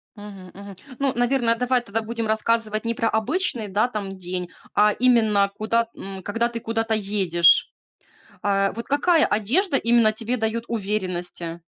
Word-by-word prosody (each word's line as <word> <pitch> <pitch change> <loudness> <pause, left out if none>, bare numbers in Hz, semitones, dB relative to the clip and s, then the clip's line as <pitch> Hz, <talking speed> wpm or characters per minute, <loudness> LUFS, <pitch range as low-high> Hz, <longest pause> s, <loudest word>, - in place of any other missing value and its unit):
Мгм, 200 -3 -11
мгм. 200 0 -11 0.2
Ну, 275 -2 0
наверное, 240 -1 +1
давай 250 +1 +1
тогда 225 -1 -3
будем 230 0 -4
рассказывать 220 0 0
не 230 - 0
про 230 -1 0
обычный, 230 - -1
да, 205 +4 +1
там 200 -5 -6
день, 180 -1 -4 0.3
а 210 0 +5
именно 220 -5 +3
куда, 230 +2 0
м, 195 -1 -8
когда 230 +5 0
ты 235 -1 -5
куда-то 225 0 -2
едешь. 195 -5 +3 0.7
А, 195 -1 +1
вот 230 - -7
какая 310 +3 +3
одежда 275 - +1
именно 235 -3 +3
тебе 225 +3 -3
даёт 225 0 -2
уверенности? 180 -5 -4
220 Hz, 155 wpm, -23 LUFS, 200-235 Hz, 0.7 s, а